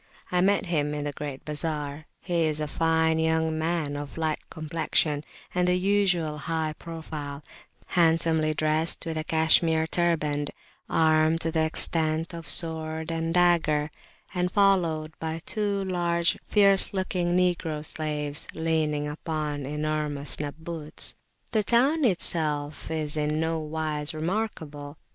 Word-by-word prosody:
I 180 0 +2
met 200 +1 +2
him 150 -4 0
in 145 - -3
the 145 - -2
great 145 -1 -7
bazar; 150 -1 -3
he 170 -3 0
is 155 -1 -1
a 150 - -2
fine 160 +1 +2
young 160 0 +1
man 160 -3 -1
of 145 +1 -7
light 160 -1 -1
complexion 155 -2 -1 0.3
and 180 0 +1
the 180 - +3
usual 180 -5 +1
high 160 +1 -2
profile, 155 -3 -7 0.4
handsomely 160 -2 +2
dressed, 155 +2 0
with 165 -1 -3
a 155 - -2
Cashmere 160 0 +3
turband, 155 -4 0 0.4
armed 160 0 +3
to 165 - -1
the 160 -1 +1
extent 160 +1 +1
of 165 -1 -6
sword 160 0 +3
and 165 0 -2
dagger, 165 -4 +2 0.4
and 180 0 0
followed 170 -6 +2
by 160 0 -3
two 205 -2 -1
large, 170 -2 +1
fierce 200 -1 +3
looking 180 -2 0
Negro 170 -4 0
slaves 150 -2 -2
leaning 155 -2 0
upon 150 -2 -3
enormous 150 -1 -2
Nabbuts. 155 +1 -3 0.4
The 220 -2 +2
town 265 +9 +3
itself 155 -7 +1
is 155 -2 -2
in 150 0 0
no 160 0 0
wise 155 0 -2
remarkable. 155 -5 -4
160 Hz, 135 wpm, -26 LUFS, 150-170 Hz, 0.4 s, the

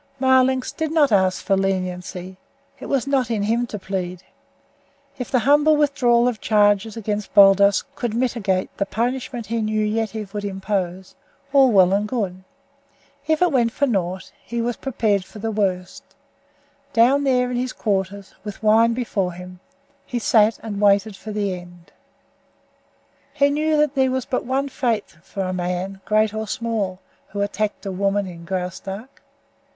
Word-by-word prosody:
Marlanx 260 0 +3
did 315 -2 -3
not 305 -5 +3
ask 190 -2 +2
for 195 - +2
leniency; 185 -1 -3 0.4
it - - -8
was 275 -4 0
not 270 -4 +1
in 220 -3 -1
him 235 +3 0
to 215 - -5
plead. 185 -2 -4 1.0
If 250 - -4
the 260 - +2
humble 295 +5 +4
withdrawal 250 -5 +3
of 240 -3 -2
charges 210 0 +2
against 210 -1 -4
Baldos 200 0 +6
could 240 -5 -3
mitigate 225 -7 -1
the 200 - -1
punishment 240 +2 -2
he 230 +1 -2
knew 215 0 0
Yetive 220 -1 -3
would 205 -1 -4
impose, 190 -2 -3 0.4
all 270 -3 +6
well 190 -3 +5
and 205 +1 +1
good. 195 -6 -3 0.8
If 315 +2 +2
it 355 - +3
went 240 -4 +2
for 285 - +1
naught, 190 -6 -2
he 235 - -4
was 235 0 -1
prepared 220 -7 0
for 215 - -14
the 225 +2 -3
worst. 185 -4 -2 0.9
Down 255 +5 +4
there 250 -2 +2
in 245 - -1
his 255 +1 -2
quarters, 195 -1 -2
with 210 0 -8
wine 225 +2 +4
before 200 -7 -2
him, 180 +1 -10 0.4
he 245 - -4
sat 220 -1 +3
and 210 -2 -4
waited 200 0 +3
for 215 +2 -8
the 205 -2 -1
end. 175 -1 -11 1.4
He 280 0 +3
knew 305 +1 +1
that 300 -2 +2
there 265 -2 +2
was 260 -1 -2
but 255 - -2
one 270 +3 0
fate 235 -5 -2
for 195 +2 -5
the 185 0 -2
man, 180 +2 -3
great 215 0 +2
or 220 0 -4
small, 210 -5 -2 0.3
who 200 - -4
attacked 205 +1 -2
a 195 - -3
woman 200 +2 0
in 170 -2 -10
Graustark. 190 +6 -5
215 Hz, 165 wpm, -22 LUFS, 195-245 Hz, 1.4 s, Baldos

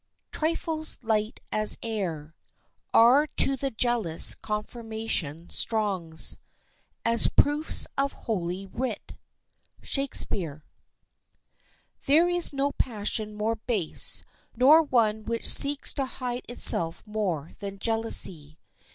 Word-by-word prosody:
] - - -52
"Trifles 315 0 -2
light 215 -1 -1
as 215 0 +4
air, 175 -9 -5 0.6
Are 255 +6 +5
to 275 - +4
the 275 +1 -3
jealous 225 -8 +2
confirmation 210 -7 -5
strong 195 -8 -2 0.9
As 230 0 +3
proofs 295 +2 +2
of 275 0 0
holy 185 -3 -4
writ." 230 +2 -6 0.7
—SHAKESPEARE. 175 - -2 1.4
There 315 +5 +4
is 350 -1 0
no 280 0 -1
passion 215 -4 -2
more 220 +2 -2
base, 215 -7 +1 0.3
nor 280 +7 +6
one 225 -7 0
which 230 +1 -3
seeks 280 0 +5
to 275 - -2
hide 250 -1 -6
itself 170 -8 +4
more 190 -8 -4
than 200 -1 -7
jealousy. 190 -9 0
225 Hz, 105 wpm, -26 LUFS, 195-260 Hz, 1.4 s, nor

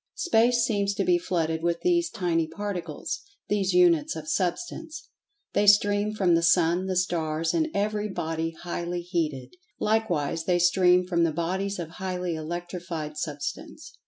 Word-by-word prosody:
Space 240 -7 +3
seems 200 -2 0
to - - 0
be 350 0 +3
flooded 165 - -1
with 170 0 -1
these 345 -1 +2
tiny 165 -3 0
particles—these 195 +3 -4
Units 175 -4 +4
of 155 -1 -7
Substance. 310 - -3 0.4
They 205 - +2
stream 205 +1 +4
from 185 -4 +3
the 165 - +4
Sun; 170 +2 +3
the 190 - -1
Stars; 165 -3 0
and 320 -1 +1
every 210 -1 -1
body 165 -3 -2
highly 175 0 -3
heated. 165 - -3 0.3
Likewise 175 -8 0
they 180 0 +2
stream 180 0 +4
from 170 -2 +1
the 165 - +2
bodies 190 +5 -2
of 170 -3 -5
highly 180 -2 -2
electrified 170 -1 -5
Substance. 145 -2 -6
180 Hz, 145 wpm, -26 LUFS, 165-205 Hz, 0.4 s, Units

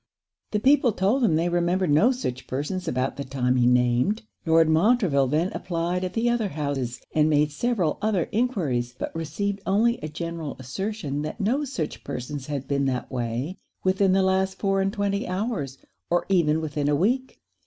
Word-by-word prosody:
The 210 - 0
people 260 -1 +4
told 210 +9 +1
him 180 -9 +3
they 165 +2 +1
remembered 175 0 +1
no 195 - +5
such 130 - -4
persons 150 +8 -3
about 130 +1 -1
the 140 - -3
time 130 -2 0
he 120 -1 +3
named. 125 - +2 0.2
Lord 165 0 +5
Montreville 160 - +3
then 155 +7 +1
applied 175 +1 -2
at 185 - -3
the 230 +1 +1
other 240 -3 +1
houses, 140 -7 -3
and 155 0 +3
made 150 0 +3
several 185 -2 0
other 205 -6 +1
enquiries; 155 - 0
but - - -5
received 195 +6 -2
only 230 +5 +2
a 155 - -5
general 165 -1 -5
assertion 145 - -4
that 155 +7 -5
no 250 +8 +1
such 195 - -4
persons 130 +2 -5
had 140 -3 -4
been 140 -1 0
that 130 -2 -2
way 125 +7 -3 0.2
within 190 0 +3
the 190 0 +3
last 190 0 +1
four 195 -1 +1
and 195 0 +1
twenty 200 -1 -1
hours, 185 - -3 0.3
or 175 0 +1
even 160 -4 +3
within 150 -2 -1
a 145 - +3
week. 250 - 0
170 Hz, 180 wpm, -25 LUFS, 140-200 Hz, 0.3 s, no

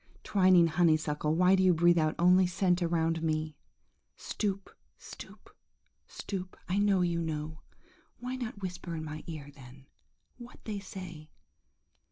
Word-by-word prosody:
twining 185 -3 +5
honeysuckle, 155 -2 +1
why 180 +2 +4
do 190 - +4
you 185 -2 +4
breathe 170 +1 +4
out 155 0 +1
only 180 +2 +5
scent 180 0 +1
around 165 -1 0
me? 155 -1 -1 0.6
Stoop, 200 -2 -4 0.2
stoop, - - -12 0.5
stoop! 185 -2 -6
I 185 +3 0
know 200 -2 +3
you 170 -1 0
know! 155 -1 -4 0.6
Why 250 +1 -5
not 235 -5 -6
whisper 180 -2 -5
in 155 - -5
my 155 0 -7
ear, 150 -4 -7
then, 135 -1 -15 0.5
what 240 0 -12
they 210 -2 -3
say? 180 -5 -9
175 Hz, 140 wpm, -30 LUFS, 155-190 Hz, 0.6 s, twining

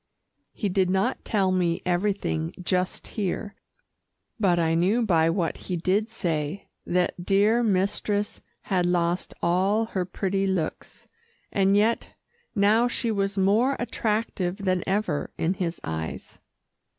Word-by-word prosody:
He 210 - -2
did 185 -1 +1
not 190 +1 0
tell 195 -3 +1
me 175 -2 +1
everything 175 -3 -1
just 180 0 -1
here, 205 0 -3 0.9
but 185 -5 +3
I 165 -1 +2
knew 190 +8 +2
by 165 -6 +3
what 165 -1 -1
he 180 - -4
did 195 +6 +1
say, 165 -3 -2 0.2
that 180 0 0
dear 205 +5 +3
mistress 205 0 0 0.2
had 180 -3 0
lost 175 0 0
all 190 +6 +2
her 190 -4 -2
pretty 195 +1 -1
looks, 180 -5 -3 0.4
and 195 0 +3
yet 220 +3 +1 0.4
now 215 +4 +4
she 235 -1 -1
was 195 -1 -1
more 215 +8 +3
attractive 215 -5 -1
than 185 -3 0
ever 190 -6 0
in 165 +3 +1
his 175 -3 -3
eyes. 80 0 -5
190 Hz, 130 wpm, -26 LUFS, 175-205 Hz, 0.9 s, now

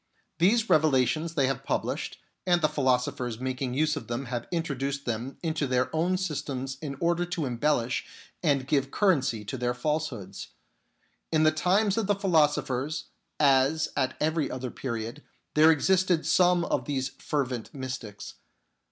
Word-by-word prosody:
These 220 +6 +4
revelations 155 +2 +2
they 140 -4 +3
have 135 -1 -2
published, - - -2 0.3
and 175 -1 +4
the - - +6
philo 130 -4 +2
sophers 125 -2 -4
making 130 0 -3
use 155 +2 +2
of - - -6
them 120 +3 -3
have 120 -2 -4
introduced 140 -5 -2
them 120 +3 -3
into 160 -3 -1
their 125 +3 0
own 175 +4 +1
systems 140 -7 -3
in 140 -3 -4
order 170 +1 +1
to 170 -3 -3
embellish 125 -1 0 0.3
and 140 -5 +2
give 140 -2 +1
currency 135 - +1
to 130 +4 -5
their 125 0 0
falsehoods. 125 -8 -3 0.8
In 155 -1 +3
the 155 - +5
times 190 +6 +2
of 220 -3 0
the 205 - +3
philosophers, 150 - +1 0.3
as 140 +2 +3
at 130 -1 0
every 155 0 0
other 125 -1 -4
period, 115 +2 -5 0.3
there 155 +1 +6
existed 175 +2 +3
some 180 -1 +4
of - - -1
these 135 -2 -1
fervent 130 -5 -2
mystics. 130 -6 -6
140 Hz, 150 wpm, -28 LUFS, 130-160 Hz, 0.8 s, the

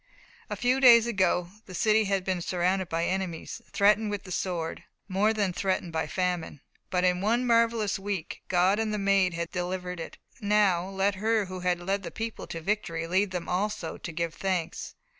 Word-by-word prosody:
A - - -2
few 250 +2 +1
days 235 -3 +8
ago 185 -6 +1 0.2
the 185 - -8
city 215 +2 +3
had 195 -1 0
been 185 -1 -1
surrounded 180 +1 0
by 165 +1 0
enemies, 185 -3 -3
threatened 210 +1 +3
with 205 -2 -4
the 185 - -10
sword, 170 -3 -3 0.2
more 200 +3 +2
than 205 -4 0
threatened 185 -2 -1
by 160 -1 -1
famine. 180 -4 -2 0.3
But 180 0 0
in 180 0 +2
one 235 +5 +1
marvellous 230 -3 +2
week 195 -4 -4
God 185 +3 +3
and 220 -1 0
the 210 - -1
Maid 195 -3 +2
had 170 0 -3
delivered 180 0 -3
it. 165 - -7 0.2
Now 200 -4 +2
let 195 +1 +1
her 220 -1 +2
who 185 0 -7
had 180 -1 0
led 195 +3 -1
the - - -6
people 225 0 -5
to 165 - -6
victory 165 -3 -2
lead 190 +4 +1
them 180 -2 -4
also 185 -2 -2
to - - -6
give 165 0 -2
thanks. 185 -4 -3
190 Hz, 190 wpm, -28 LUFS, 180-210 Hz, 0.3 s, days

